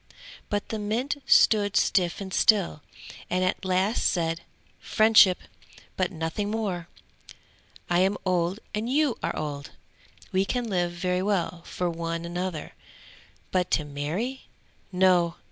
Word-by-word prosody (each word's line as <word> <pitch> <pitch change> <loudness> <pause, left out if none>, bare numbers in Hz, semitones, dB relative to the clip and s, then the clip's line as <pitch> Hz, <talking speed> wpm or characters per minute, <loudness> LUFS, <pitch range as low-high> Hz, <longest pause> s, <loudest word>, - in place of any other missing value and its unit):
But 205 -1 -2
the 220 - -3
mint 240 +8 -2
stood 205 -2 +5
stiff 175 -3 +2
and 190 -1 -6
still, 195 -8 +3 0.5
and 185 +1 +1
at 185 - -1
last 190 +4 +1
said: 165 -2 0 0.4
"Friendship 215 -4 +5 0.6
but 185 -1 0
nothing 165 +4 -3
more! 200 -6 -3 1.0
I 175 0 +2
am 190 +2 +2
old 180 +1 0
and 215 +3 -2
you 285 -2 +1
are - - -2
old! 145 -2 -5 0.6
We 190 +1 +2
can 245 +4 -2
live 175 -4 0
very 180 +1 -1
well 180 -4 -1
for 180 - -2
one 165 0 -3
another, 175 -2 -4 0.8
but 180 -1 +1
to 155 - -5
marry? 160 - -4 0.4
No! 180 -2 +3
185 Hz, 130 wpm, -26 LUFS, 170-205 Hz, 1.0 s, stood